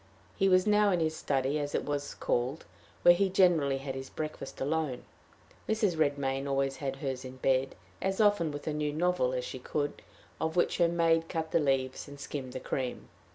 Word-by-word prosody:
He 195 -1 +3
was 185 0 +5
now 210 -1 +4
in 180 -3 +2
his 160 -1 0
study, 140 0 0
as 145 0 -3
it - - -1
was 145 -1 -3
called, 125 +6 -1 0.4
where 175 - +9
he 190 +2 +2
generally 170 -8 +3
had 135 0 -5
his 135 0 -6
breakfast 155 -3 -6
alone. 145 -2 -1 0.7
Mrs. 215 -5 +2
Redmain 140 -3 0
always 135 0 0
had 135 -3 -3
hers 135 -2 -4
in 130 0 -8
bed, 130 0 +1 0.3
as 190 +1 -1
often 205 -7 +3
with 145 0 -7
a 155 - -1
new 150 0 -1
novel 175 -5 +1
as 125 -1 -2
she 130 - -6
could, 145 +3 -3 0.4
of 160 +1 -1
which 175 - +2
her 170 - +5
maid 165 -1 +2
cut 160 -2 -3
the - - +3
leaves, 135 -3 0
and 145 0 -11
skimmed 135 -3 -5
the 130 - -4
cream. 125 -1 -4
145 Hz, 200 wpm, -30 LUFS, 135-170 Hz, 0.7 s, where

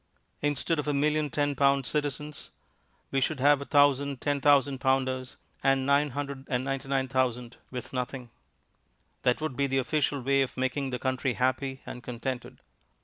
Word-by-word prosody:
Instead 145 +2 0
of 150 - -3
a 145 - +1
million 150 +1 +1
ten 145 0 0
pound 140 -1 +3
citizens, 150 +2 -3 0.6
we 135 - +1
should 140 +1 0
have 145 +1 +5
a - - -5
thousand 140 -1 +3
ten 145 0 -1
thousand 140 -2 +4
pounders 130 -1 0 0.3
and 135 -1 +3
999,000 135 -3 -1
with 125 0 -7
nothing. 125 -1 -4 0.9
That 125 +3 +2
would 155 -4 -2
be 140 +1 +1
the 135 0 0
official 140 +2 +1
way 135 +2 +2
of 130 - -2
making 130 +2 -1
the 125 - -2
country 130 0 -1
happy 130 +1 -1
and 125 - -7
contented. 125 +1 -5
135 Hz, 145 wpm, -28 LUFS, 130-145 Hz, 0.9 s, have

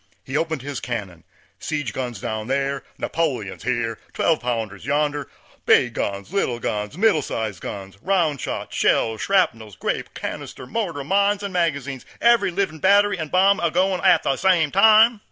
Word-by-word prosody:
He 135 - -6
opened 160 -3 -1
his 140 -3 -4
cannon, 100 -10 -6 0.3
siege 145 -7 -3
guns 120 -5 -4
down 110 +1 -4
thar, 140 +1 -1
Napoleons 130 - -2
here, 115 -2 -2
twelve 160 -2 +2
pounders 115 -5 -3
yonder, 145 0 -1 0.4
big - - +4
guns, 100 - -4
little 130 -12 0
guns, 105 +3 -3
middle 205 -6 +3
sized 110 -6 -4
guns, 100 0 -7
round 165 -7 +1
shot, - - -5
shells, 110 -1 +1
shrapnels, 115 - +1
grape, - - -3
canister, - - -6
mortar, 170 - -3
mines 200 +5 +2
and 200 -1 -4
magazines, 145 -7 -1 0.2
every 235 -5 +4
livin' 175 -3 -2
battery 200 +2 +4
and 160 -2 -4
bomb 195 +3 +4
a 170 - +1
goin' 185 +2 +1
at - - +4
the 135 - 0
same 170 -6 +3
time. 220 +3 +6
145 Hz, 160 wpm, -22 LUFS, 120-190 Hz, 0.4 s, time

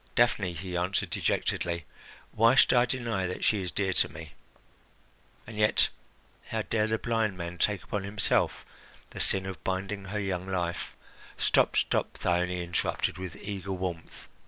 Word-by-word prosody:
"Daphne," 105 -7 +3
he 90 +2 -6
answered 90 +2 0
dejectedly, 85 -1 -1 0.5
"why 115 +3 +5
should - - +6
I 120 -1 +5
deny 115 -7 -1
that 90 - -5
she 105 -3 +3
is 90 - -3
dear 95 0 0
to - - +3
me? 80 -1 -9 1.1
And 110 - -9
yet, 105 0 +4 0.6
how - - -2
dare 110 -1 +1
the 110 0 +1
blind 110 -4 0
man 85 0 -6
take 105 -3 +1
upon 105 -2 -3
himself 100 0 +1 0.5
the - - -8
sin 95 -1 +3
of 95 -5 -7
binding 95 +1 -2
her 105 +3 -3
young 95 -2 -2
life 90 -2 -2 0.2
" - - -19
"Stop! - - +3
stop!" - - +1
Thyone 90 0 +1
interrupted 85 +1 -1
with 95 -2 -6
eager 100 -1 -5
warmth. 90 -3 -5
95 Hz, 160 wpm, -29 LUFS, 90-105 Hz, 1.1 s, should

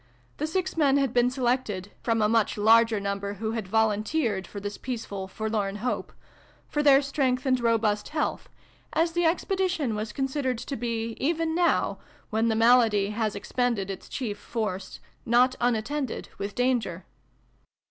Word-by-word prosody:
The 305 - -1
six 375 +3 -2
men 280 -3 +4
had 275 -3 +1
been 245 0 +4
selected 245 -7 -1
from 225 -2 +1
a - - +4
mucJi 225 -1 +2
larger 225 0 +5
number 200 0 -3
who 220 +2 -3
had 225 -4 -3
volunteered 215 - +1
for 205 - -7
this 205 0 -5
peace 245 -3 -5
f^d 190 -1 -6
'forlorn 215 -2 -2
hope 235 +4 -3 0.3
' - - -30
for 295 - +1
their 285 -1 +6
strength 270 -2 0
and 255 -1 +2
robust 225 -3 +1
health, 305 -1 -2 0.4
as 330 +1 +2
the 345 +1 +1
expedition 355 - 0
was 215 +1 -3
considered 270 -2 -1
to 250 +4 -5
be, 230 -1 -3
even 325 +2 0
now, 345 +1 +1 0.3
when 220 +1 +1
the 225 - +1
malady 225 -3 +4
has 215 -1 -1
expended 210 -2 -1
its 190 - -9
chief 225 -6 -4
force, 205 -5 -4 0.2
not 245 +2 +4
unattended 245 +3 -1
with 200 0 -4
danger. 245 -8 0
230 Hz, 160 wpm, -27 LUFS, 210-270 Hz, 0.4 s, their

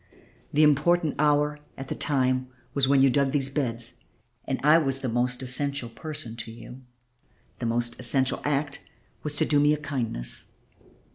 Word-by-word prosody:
The 150 +2 +4
important 155 +2 +3
hour 150 0 +2 0.2
at 135 - -7
the - - -3
time 130 -3 +1 0.3
was 140 -2 +2
when 135 -1 +4
you 135 - +5
dug 140 +1 +2
these 135 -2 +1
beds, 120 -4 -3 0.5
and 135 - -2
I 155 +3 +6
was 135 -3 0
the 130 - -2
most 125 +2 0
essential 135 0 -2
person 115 -1 -5
to 115 -1 -6
you, 115 - -12
and 130 +1 -11 0.8
the 120 - -2
most 120 +1 +1
essential 130 +1 0
act 145 -1 -1 0.4
was 150 -1 0
to - - +5
do 145 -2 +3
me 145 +1 +4
a - - 0
kindness. 125 - -3
135 Hz, 170 wpm, -26 LUFS, 125-145 Hz, 0.8 s, I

